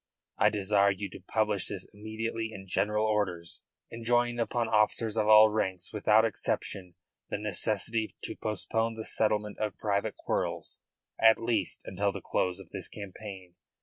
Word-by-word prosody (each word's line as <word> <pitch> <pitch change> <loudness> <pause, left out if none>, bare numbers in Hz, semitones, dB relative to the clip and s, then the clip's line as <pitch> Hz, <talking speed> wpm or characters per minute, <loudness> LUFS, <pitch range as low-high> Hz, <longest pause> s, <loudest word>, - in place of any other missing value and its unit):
I - - +6
desire 100 0 +3
you 100 0 -3
to - - -9
publish 105 0 0
this 95 -3 -4
immediately 110 +2 -4
in 95 -3 -9
general 105 +3 +1
orders, 95 -6 -1 0.3
enjoining 120 +1 +1
upon 115 0 0
officers 110 0 +2
of 110 -2 +1
all 110 0 +9
ranks 95 -4 -1
without 105 +1 +4
exception 95 -4 -3 0.3
the - - -1
necessity 105 +2 0
to - - -4
postpone 110 +2 -1
the 110 -1 -6
settlement 105 -1 0
of 105 -3 -2
private 100 -2 0
quarrels 85 -2 -2 0.4
at 110 0 +7
least 115 -5 -1
until 100 +2 0
the - - -6
close 90 -1 -1
of - - -13
this - - -4
campaign. 95 -2 -9
105 Hz, 150 wpm, -30 LUFS, 95-110 Hz, 0.4 s, all